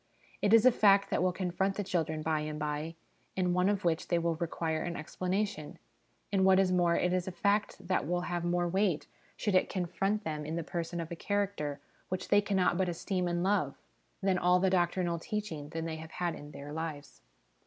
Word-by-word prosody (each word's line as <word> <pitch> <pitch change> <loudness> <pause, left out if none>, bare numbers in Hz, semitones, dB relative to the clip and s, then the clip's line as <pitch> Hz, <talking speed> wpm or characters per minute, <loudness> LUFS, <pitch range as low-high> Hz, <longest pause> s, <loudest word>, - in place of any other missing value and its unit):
It 205 - +2
is 225 +1 +7
a 255 - +9
fact 200 -3 +4
that - - +1
will 185 0 +3
confront 190 +1 -1
the 205 - -2
children 160 -4 -1
by 155 -1 +1
and 150 0 -4
by, 150 +2 -3 0.4
and 180 -1 +2
one 180 +2 +3
of 205 -2 -1
which 165 0 +1
they 175 - +2
will 170 0 +1
require 160 -1 -2
an 170 +1 -3
explanation; 185 +1 -3 0.6
and 190 -1 +3
what 190 0 +6
is 190 -1 +3
more, 175 -2 +3
it 180 0 +1
is 185 -1 0
a - - -2
fact 200 -1 0
that 185 -6 0
will 175 +1 0
have 175 -1 -2
more 175 0 +1
weight, 185 -3 +1 0.3
should 210 - -1
it 185 - +3
confront 195 +3 -1
them 155 -3 -3
in 155 +2 -4
the 170 - -2
person 170 +1 -4
of 165 0 -5
a - - -3
character 195 -7 -2 0.3
which 185 0 -3
they 205 0 +6
cannot 190 -4 +1
but 185 -1 +2
esteem 180 +1 -2
and 175 0 0
love, 185 -8 +1 0.5
than 190 -2 +2
all 180 +1 +4
the 190 0 +2
doctrinal 175 -1 +1
teaching 165 -7 -4
they 165 0 -4
have 160 0 -10
had 175 -2 -1
in 145 - -9
their 145 0 -8
lives. 155 -3 -6
175 Hz, 210 wpm, -31 LUFS, 160-190 Hz, 0.6 s, a